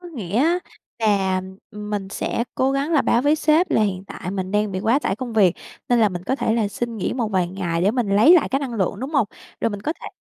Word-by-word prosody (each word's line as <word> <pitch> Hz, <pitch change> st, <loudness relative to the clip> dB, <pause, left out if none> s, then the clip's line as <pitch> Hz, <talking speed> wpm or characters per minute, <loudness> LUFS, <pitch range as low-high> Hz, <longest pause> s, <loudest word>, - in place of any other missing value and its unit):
Có 355 Hz, -, -10 dB
nghĩa 215 Hz, -, -5 dB
á, 335 Hz, +6 st, +3 dB, 0.4 s
là, 195 Hz, -4 st, +2 dB, 0.3 s
ừm, 210 Hz, 0 st, -8 dB
mình 200 Hz, -2 st, -3 dB
sẽ 235 Hz, -, -2 dB
cố 265 Hz, +1 st, +1 dB
gắng 280 Hz, +4 st, -1 dB
là 295 Hz, -, +4 dB
báo 240 Hz, -, +2 dB
với 295 Hz, +2 st, +3 dB
sếp 320 Hz, +3 st, +2 dB
là 220 Hz, -, +3 dB
hiện 190 Hz, -2 st, -2 dB
tại 180 Hz, -, -6 dB
mình 190 Hz, -1 st, -3 dB
đang 210 Hz, 0 st, 0 dB
bị 185 Hz, -, -2 dB
quá 230 Hz, +6 st, +3 dB
tải 195 Hz, -8 st, -2 dB
công 245 Hz, -2 st, -5 dB
việc, 195 Hz, -6 st, +4 dB, 0.3 s
nên 245 Hz, -1 st, +3 dB
là 215 Hz, -, +5 dB
mình 180 Hz, -1 st, -6 dB
có 265 Hz, -, 0 dB
thể 225 Hz, -, 0 dB
là 215 Hz, -3 st, +1 dB
xin 235 Hz, +2 st, -4 dB
nghỉ 195 Hz, -, -2 dB
một 235 Hz, -4 st, -1 dB
vài 185 Hz, -4 st, 0 dB
ngày 175 Hz, -3 st, -2 dB
để 200 Hz, -, +4 dB
mình 240 Hz, -4 st, -1 dB
lấy 305 Hz, +12 st, +7 dB
lại 340 Hz, -, +3 dB
cái 270 Hz, -, 0 dB
năng 265 Hz, -4 st, -4 dB
lượng, 200 Hz, 0 st, -1 dB
đúng 265 Hz, +3 st, -4 dB
hông? 275 Hz, -9 st, +2 dB, 0.3 s
Rồi 230 Hz, -, +1 dB
mình 205 Hz, 0 st, -6 dB
có 310 Hz, -, -1 dB
thể -, -, -8 dB
220 Hz, 275 wpm, -22 LUFS, 195-265 Hz, 0.4 s, lấy